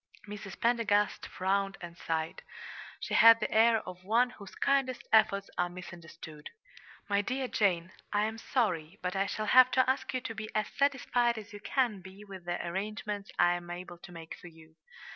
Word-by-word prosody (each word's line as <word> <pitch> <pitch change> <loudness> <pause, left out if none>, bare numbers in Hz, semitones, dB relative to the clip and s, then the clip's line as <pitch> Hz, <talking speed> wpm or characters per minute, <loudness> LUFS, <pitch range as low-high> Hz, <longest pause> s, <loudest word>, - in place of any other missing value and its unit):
Mrs. 205 -2 -8
Pendergast 225 -3 +1
frowned 195 +1 -1
and 170 -1 -9
sighed. 160 -1 -3 0.6
She - - -4
had 230 0 +8
the - - -2
air 225 0 +4
of 180 0 -9
one 235 +5 +2
whose 200 -5 -12
kindest 270 -2 0
efforts 200 -3 +4
are 175 0 +1
misunderstood. 170 -3 -10 0.6
"My 200 0 +2
dear 255 +5 -2
Jane, 185 -6 +1 0.2
I 205 0 +2
am 220 +1 -4
sorry, 190 - -1
but 180 +1 -2
I 195 +1 +1
shall 215 - -3
have 255 +4 +7
to 255 - +4
ask 260 +1 0
you 255 - -1
to 230 - -5
be 215 0 -6
as 215 -1 0
satisfied 245 -4 +1
as 215 0 -9
you 205 - -8
can 225 -3 0
be 190 +3 -12
with 190 -3 -10
the 175 0 -2
arrangements 205 +2 -4
I 175 - +4
am 175 0 -6
able 175 0 -8
to 175 - -12
make 165 -2 -9
for - - -11
you. 160 -1 -16
200 Hz, 185 wpm, -31 LUFS, 175-225 Hz, 0.6 s, had